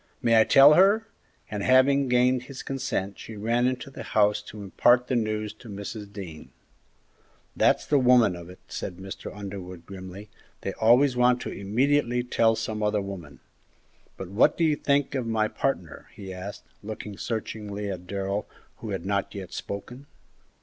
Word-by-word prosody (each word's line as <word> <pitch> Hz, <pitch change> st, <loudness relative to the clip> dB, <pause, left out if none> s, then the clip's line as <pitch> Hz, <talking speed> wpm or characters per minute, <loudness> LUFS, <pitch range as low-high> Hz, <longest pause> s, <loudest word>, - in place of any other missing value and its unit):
May 115 Hz, -1 st, +5 dB
I -, -, +4 dB
tell 140 Hz, +2 st, +8 dB
her?" 200 Hz, +6 st, +5 dB, 0.5 s
And, 105 Hz, -1 st, -3 dB
having 130 Hz, +4 st, +4 dB
gained 125 Hz, 0 st, +3 dB
his 135 Hz, -1 st, -8 dB
consent, 130 Hz, -8 st, -3 dB
she 110 Hz, -, -9 dB
ran 115 Hz, +4 st, +1 dB
into 130 Hz, +2 st, -3 dB
the -, -, -8 dB
house 105 Hz, -1 st, +2 dB
to 105 Hz, -1 st, -10 dB
impart 120 Hz, +5 st, +3 dB
the 130 Hz, -, -1 dB
news 110 Hz, -2 st, -1 dB
to 110 Hz, +2 st, -14 dB
Mrs. 100 Hz, +1 st, -7 dB
Dean. 90 Hz, -6 st, -9 dB, 1.1 s
"That's -, -, +3 dB
the 145 Hz, -, +3 dB
woman 125 Hz, -7 st, +5 dB
of 85 Hz, 0 st, -10 dB
it!" 90 Hz, -, -12 dB
said 90 Hz, -, -6 dB
Mr. 95 Hz, 0 st, -8 dB
Underwood, 95 Hz, -4 st, -8 dB
grimly; 95 Hz, +1 st, -9 dB, 0.3 s
"they 95 Hz, -, -3 dB
always 125 Hz, +4 st, +4 dB
want 125 Hz, 0 st, +4 dB
to -, -, -5 dB
immediately 125 Hz, +4 st, +1 dB
tell 115 Hz, -2 st, +2 dB
some 110 Hz, -1 st, -4 dB
other 105 Hz, 0 st, +1 dB
woman! 95 Hz, -7 st, -8 dB, 0.8 s
But 95 Hz, -, -7 dB
what 115 Hz, +10 st, +3 dB
do 170 Hz, -, +1 dB
you 155 Hz, -2 st, +3 dB
think 140 Hz, -1 st, +1 dB
of 130 Hz, -4 st, -2 dB
my 110 Hz, -1 st, +1 dB
partner?" 110 Hz, -, -3 dB
he 95 Hz, -2 st, -8 dB
asked, 95 Hz, +2 st, -8 dB, 0.2 s
looking 105 Hz, -1 st, -7 dB
searchingly 105 Hz, -2 st, -4 dB
at 90 Hz, -1 st, -7 dB
Darrell, 100 Hz, +1 st, -3 dB, 0.3 s
who 110 Hz, -, -7 dB
had 95 Hz, -3 st, -4 dB
not 100 Hz, 0 st, -1 dB
yet 95 Hz, -2 st, -7 dB
spoken. 125 Hz, +7 st, -7 dB
110 Hz, 170 wpm, -26 LUFS, 100-125 Hz, 1.1 s, tell